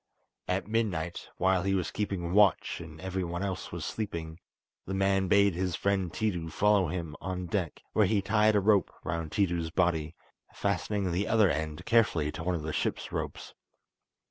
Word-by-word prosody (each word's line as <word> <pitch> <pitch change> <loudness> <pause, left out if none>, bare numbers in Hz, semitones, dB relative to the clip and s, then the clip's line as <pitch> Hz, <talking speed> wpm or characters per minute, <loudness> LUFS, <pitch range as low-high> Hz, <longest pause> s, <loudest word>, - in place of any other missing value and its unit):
At 95 +2 -1
midnight, 95 -7 -1
while 95 0 +3
he 95 +1 +1
was 90 -3 -1
keeping 95 -4 -2
watch 105 -4 +3
and 80 -1 -11
everyone 95 -1 -3
else 95 -3 -4
was - - -4
sleeping, 85 -6 -4 0.5
the 95 - -2
man 95 0 +2
bade 100 +1 +4
his 90 0 -1
friend 95 -3 0
Tiidu 90 -6 -2
follow 105 0 +3
him 80 -2 -4
on 90 0 -3
deck, 90 -3 -3
where 105 -3 +4
he 105 +1 +2
tied 105 +2 +3
a - - +5
rope 100 -1 +3
round 85 -2 -3
Tiidu's 85 -5 0
body, 80 -2 0 0.4
fastening 100 0 -1
the 90 +4 0
other 110 -5 +4
end 75 +1 -3
carefully 95 -10 +3
to 80 - -6
one 90 +1 0
of 80 - -4
the 80 0 -3
ship's - - -2
ropes. - - -5
95 Hz, 170 wpm, -29 LUFS, 85-100 Hz, 0.5 s, a